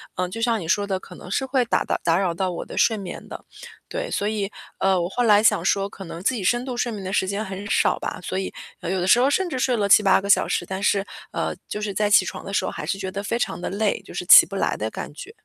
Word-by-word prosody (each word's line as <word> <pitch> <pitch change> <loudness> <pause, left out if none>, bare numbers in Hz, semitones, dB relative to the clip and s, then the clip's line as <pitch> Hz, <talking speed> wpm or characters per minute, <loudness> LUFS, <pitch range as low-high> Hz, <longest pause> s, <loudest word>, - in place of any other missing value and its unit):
呃， 180 0 -1
就 225 +6 -6
像 230 -1 +1
你 165 - -7
说 200 +4 +1
的， 190 -2 -1
可 185 - -13
能 180 - -11
是 265 - -1
会 260 -1 +1
打 - - +1
打 - - 0
打 165 0 +3
扰 185 -3 0
到 185 +2 -1
我 170 - -5
的 - - -9
睡 225 - +3
眠 195 -3 -7
的。 - - -9 0.4
对， - - -4
所 205 - -1
以 210 -2 -2 0.3
呃， 190 -1 +2
我 170 - -1
后 245 +7 -1
来 210 -2 +5
想 195 -6 +4
说， 195 +1 +1
可 195 -1 -10
能 165 0 -8
自 260 - +2
己 225 -6 -4
深 240 +6 +1
度 255 -2 -4
睡 240 0 -1
眠 205 -3 -6
的 190 +1 -4
时 190 - +1
间 200 +3 -2
很 195 +1 -7
少 - - +2
吧， - - -5
所 185 - -3
以 190 - -4 0.3
呃， 175 - -4
有 190 +1 0
的 175 - -1
时 235 - +6
候 260 +3 +4
甚 370 +6 +1
至 265 -7 -3
睡 250 -1 +1
了 205 -2 +1
7-8 200 -1 +6
个 195 - -6
小 200 - +4
时， - - -1
但 190 +2 -5
是 200 -1 +2 0.3
呃， - - -2
就 210 - -4
是 210 -1 -3
在 210 +2 +1
起 200 -2 +5
床 - - -6
的 195 - -7
时 195 - 0
候 - - -3
还 - - -6
是 195 - -2
觉 190 -1 -5
得 200 +1 -5
非 230 - -1
常 235 - -2
地 - - -3
累， 205 +1 -1
就 - - -13
是 - - -5
起 - - +10
不 - - -7
来 - - 0
的 - - -3
感 - - -7
觉。 400 - -10
200 Hz, 325 characters per minute, -23 LUFS, 190-225 Hz, 0.4 s, 起